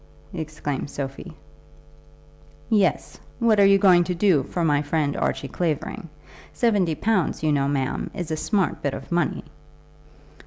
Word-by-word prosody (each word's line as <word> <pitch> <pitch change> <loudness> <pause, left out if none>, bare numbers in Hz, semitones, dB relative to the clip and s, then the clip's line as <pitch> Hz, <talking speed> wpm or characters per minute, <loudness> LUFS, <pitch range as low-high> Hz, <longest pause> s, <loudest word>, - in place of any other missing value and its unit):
exclaimed 155 -4 -4
Sophie. 135 -1 -6 1.4
"Yes. 205 -3 +1 0.2
What 225 -3 +3
are 200 - +7
you 195 0 +6
going 185 -3 +5
to 180 - -2
do 175 -5 +3
for 165 +5 -2
my 145 -2 +2
friend 145 -1 -1
Archie 140 - -2
Clavering? 165 +1 -3 0.4
Seventy 200 -9 +1
pounds, 195 -4 0
you 155 - +2
know, 140 -1 +1
ma'am, 135 -2 -2
is 175 -4 -5
a - - 0
smart 195 +4 -1
bit 140 - -2
of - - -10
money!" 170 -3 0
165 Hz, 145 wpm, -23 LUFS, 145-195 Hz, 1.4 s, are